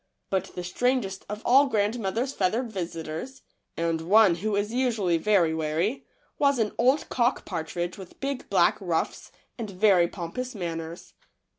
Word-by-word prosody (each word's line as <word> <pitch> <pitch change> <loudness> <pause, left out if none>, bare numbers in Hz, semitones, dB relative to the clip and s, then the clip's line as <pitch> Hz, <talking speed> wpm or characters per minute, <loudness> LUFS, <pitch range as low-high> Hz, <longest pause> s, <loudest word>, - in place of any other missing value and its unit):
But 190 -1 +1
the 180 - -4
strangest 195 +1 -1
of 210 +1 -5
all 275 +3 +6
grandmother's 225 +2 0
feathered 225 +5 0
visitors, 170 +6 -5 0.3
and 165 -1 0
one 200 +2 +5
who 205 +5 -2
is 205 +2 -1
usually 225 -9 +1
very 180 -4 +3
wary, 160 +4 0
w 270 - -9 0.4
r 280 - +6
as 280 - 0
an 220 -3 +1
old 260 +5 +3
cock 245 +1 +1
partridge 175 +1 -4
with 185 -2 -12
big 275 -1 -4
black - - +4
ruffs - - -2 0.3
and 220 -3 -4
very 185 -2 +4
pompous 220 +9 -5
manners. 165 -2 -6
200 Hz, 155 wpm, -26 LUFS, 175-240 Hz, 0.4 s, all